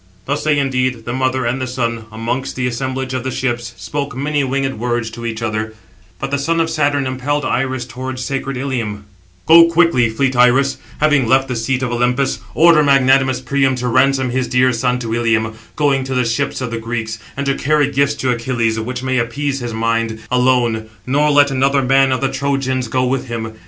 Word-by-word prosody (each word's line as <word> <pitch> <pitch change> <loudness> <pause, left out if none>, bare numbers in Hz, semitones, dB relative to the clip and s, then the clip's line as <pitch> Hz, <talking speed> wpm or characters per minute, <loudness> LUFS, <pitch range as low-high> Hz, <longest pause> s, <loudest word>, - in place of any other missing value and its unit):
Thus 140 +2 -2
they 150 -1 +2
indeed, 130 -4 -1
the 120 - -3
mother 130 0 0
and 125 +3 -1
the 130 - -2
son, 115 -3 -3
amongst 115 +4 -3
the 130 - -2
assemblage 130 +1 -3
of 130 -2 -2
the 130 - -2
ships, 120 -2 -3
spoke 145 -2 -4
many 145 +1 0
winged 135 -2 -2
words 120 -1 -2
to 115 0 -6
each 110 0 -4
other; 110 -1 -3 0.4
but 135 - -4
the 140 - 0
son 165 +4 0
of 165 0 0
Saturn 145 -2 +1
impelled 135 +3 -2
Iris 130 -1 -1
towards 130 0 -6
sacred 135 -1 -3
Ilium: 120 -6 -3 0.4
"Go 165 +1 +8
quickly, 165 -8 +3
fleet 130 +4 0
Iris, 125 +3 +4 0.2
having 150 -5 +3
left 135 +2 +3
the 125 - -2
seat 130 +3 -1
of 125 - -2
Olympus, 125 +3 0 0.2
order 165 -1 +6
magnanimous 135 -2 +3
Priam 135 +1 +1
to 125 0 -3
ransom 130 +1 +2
his 130 0 -1
dear 125 0 +2
son 125 +1 0
to 115 -2 -4
Ilium, 115 -1 +1 0.2
going 140 -3 +1
to 130 0 -3
the 125 -1 +1
ships 125 +4 -1
of 125 -2 -3
the 115 - -3
Greeks; 115 -1 -4 0.2
and 140 - -2
to 135 - +2
carry 145 +1 +1
gifts 140 +1 +1
to 130 -2 -1
Achilles, 115 -2 -1
which 125 +3 -4
may 130 -1 0
appease 135 +4 -2
his 120 -2 -4
mind, 115 0 -1
alone; 125 -3 +2 0.2
nor 145 +4 +2
let 145 -1 +4
another 135 +1 +2
man 135 +1 +3
of 130 - 0
the 135 - +1
Trojans 130 -2 -1
go 130 +3 0
with 130 +1 -1
him. 110 -2 -5
130 Hz, 205 wpm, -17 LUFS, 120-135 Hz, 0.4 s, Go